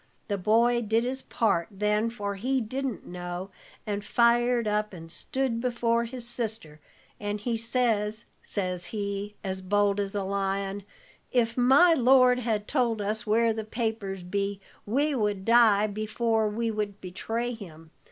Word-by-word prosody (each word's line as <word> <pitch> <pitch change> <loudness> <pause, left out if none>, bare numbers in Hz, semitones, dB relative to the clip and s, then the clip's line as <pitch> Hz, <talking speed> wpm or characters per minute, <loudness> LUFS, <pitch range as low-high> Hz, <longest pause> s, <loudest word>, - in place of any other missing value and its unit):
The 200 - 0
boy 235 +5 +3
did 225 +1 +1
his 260 +2 -3
part 200 -7 0
then, 210 +2 0
for 205 -3 -4
he 255 +7 0
didn't 255 +1 -4
know, 175 +1 -6 0.3
and 205 -1 -3
fired 235 0 +3
up 210 0 0
and 165 -2 -9
stood 235 +6 -2
before 235 -1 +1
his 240 0 -6
sister; 220 -10 -3 0.4
and 205 0 -3
he 230 +3 -1
says, 225 -2 0 0.2
says 180 -3 -3
he, 205 -1 -4
as 190 -1 -3
bold 205 +1 +2
as 200 0 -2
a 200 - 0
lion: 195 0 -2 0.5
'If 230 -2 +1
my 270 +8 +6
lord 255 -2 +5
had 220 -4 -1
told 240 -6 +1
us 210 +2 -3
where 225 +1 +3
the 220 0 -4
papers 215 -4 -3
be, 200 +2 -2 0.3
we 285 +7 +1
would 210 -6 -1
die 225 -3 +5
before 215 +1 0
we 225 +2 -1
would 210 -2 -3
betray 225 +6 -3
him. 165 -7 -11
215 Hz, 150 wpm, -27 LUFS, 200-235 Hz, 0.5 s, my